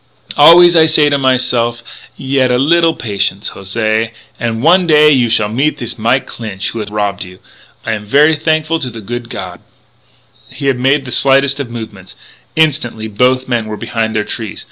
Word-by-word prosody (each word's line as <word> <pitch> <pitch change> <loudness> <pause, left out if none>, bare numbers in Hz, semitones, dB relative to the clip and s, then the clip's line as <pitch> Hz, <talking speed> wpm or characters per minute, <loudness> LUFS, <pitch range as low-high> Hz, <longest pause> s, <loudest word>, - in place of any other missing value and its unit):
Always 170 +3 +7
I 160 -1 +5
say 150 -2 +3
myse'f, 125 -3 0 0.3
yet 135 -1 0
a 125 - +1
little 165 +4 +2
patience, 100 -3 -3
José, 110 +3 -2 0.3
an' 115 -1 -3
one 175 +3 +4
day 150 -1 +5
you 125 -4 +2
shall 110 -2 +1
meet 135 +8 -1
thees 120 -1 -5
fellow 120 +4 +1
Clinch, 105 -6 -6
who 115 - -6
has 105 -1 -5
rob 105 -2 -3
you.... 90 0 -9 0.5
I - - -2
am 105 -1 -5
ver' 150 +7 +4
thankful 155 +1 -1
to 130 -5 -4
the 115 -1 -9
good 120 +3 -6
God 90 -2 -7 0.5
" - - -31
He 140 - -5
had 135 -3 0
made 135 +2 +1
the 130 - -8
slightest 135 +2 +2
of 135 -4 -5
movements: 110 -5 -9 0.4
instantly 135 -8 0
both 125 +4 0
men 120 -3 -2
were 105 0 -6
behind 110 0 -3
their 105 - 0
trees. 110 -1 -6
125 Hz, 185 wpm, -13 LUFS, 110-145 Hz, 0.5 s, Always